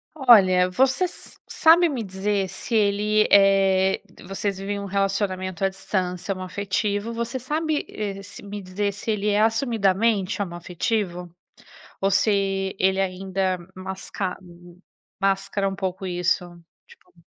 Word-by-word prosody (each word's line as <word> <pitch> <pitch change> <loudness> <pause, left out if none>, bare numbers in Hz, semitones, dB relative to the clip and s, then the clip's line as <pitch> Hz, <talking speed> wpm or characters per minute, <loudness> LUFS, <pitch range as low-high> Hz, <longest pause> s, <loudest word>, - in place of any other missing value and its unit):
Olha, 195 -10 +6
você 265 - +2
s 360 - -6
sabe 335 +2 +5
me 255 -7 -3
dizer 195 +1 -1
se 225 +5 -5
ele, 210 0 +3
eh 195 -1 +4 0.3
vocês 195 0 -2
vivem 200 +1 -3
um 200 - -5
relacionamento 195 -2 -1
à 195 - +2
distância 185 -1 -3
homoafetivo, 200 +3 -2
você 235 +2 -3
sabe, 305 +4 -2
eh, 195 -2 -5
se 200 - -10
me 205 0 -7
dizer 200 +2 -2
se 205 +3 -4
ele 210 0 0
é 205 - +2
assumidamente 220 -3 +1
homoafetivo? 175 0 -3 0.7
Ou 195 - +2
se 195 -1 +1
ele 190 +1 +2
ainda 190 0 -1 0.2
masca 190 0 -4 0.9
mascara 195 0 0
um 195 - -5
pouco 190 0 -4
isso? 180 0 0 0.4
Tipo - - -21
195 Hz, 130 wpm, -24 LUFS, 190-210 Hz, 0.9 s, Olha